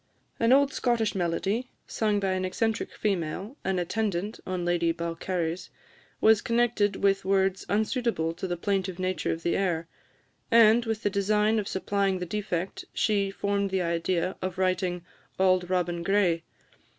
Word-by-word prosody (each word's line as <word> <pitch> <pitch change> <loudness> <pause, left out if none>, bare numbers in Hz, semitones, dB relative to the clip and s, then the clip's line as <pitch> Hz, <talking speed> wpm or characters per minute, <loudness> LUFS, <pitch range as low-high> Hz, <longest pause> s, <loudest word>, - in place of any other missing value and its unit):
An 230 +1 +3
old 275 +1 +5
Scottish 235 -4 +1
melody, 195 +7 -1 0.2
sung 210 -2 0
by 195 -1 0
an 185 0 -1
eccentric 220 +4 -1
female, 195 - -2
an 190 -1 0
attendant 200 +2 -2
on 185 -1 -2
Lady 170 -1 +2
Balcarres, 170 +1 -3 0.5
was 220 -1 +5
connected 230 -4 +1
with 195 0 +2
words 190 -1 +1
unsuitable 215 -5 0
to 180 +3 -5
the 175 -1 -2
plaintive 190 0 -1
nature 185 0 -1
of 165 0 -4
the 170 - +1
air; 170 -4 0 0.6
and, 230 0 +6
with 225 -1 -3
the 205 - +1
design 210 +2 +2
of 205 - -3
supplying 195 0 0
the 180 - -4
defect, 190 -1 -3
she 200 -2 +1
formed 200 0 -1
the 190 -1 0
idea 170 +2 -1
of 185 -1 -3
writing 185 -1 0 0.3
"Auld 185 -1 +3
Robin 175 -2 0
Gray." 180 -2 +2
190 Hz, 150 wpm, -27 LUFS, 175-210 Hz, 0.6 s, and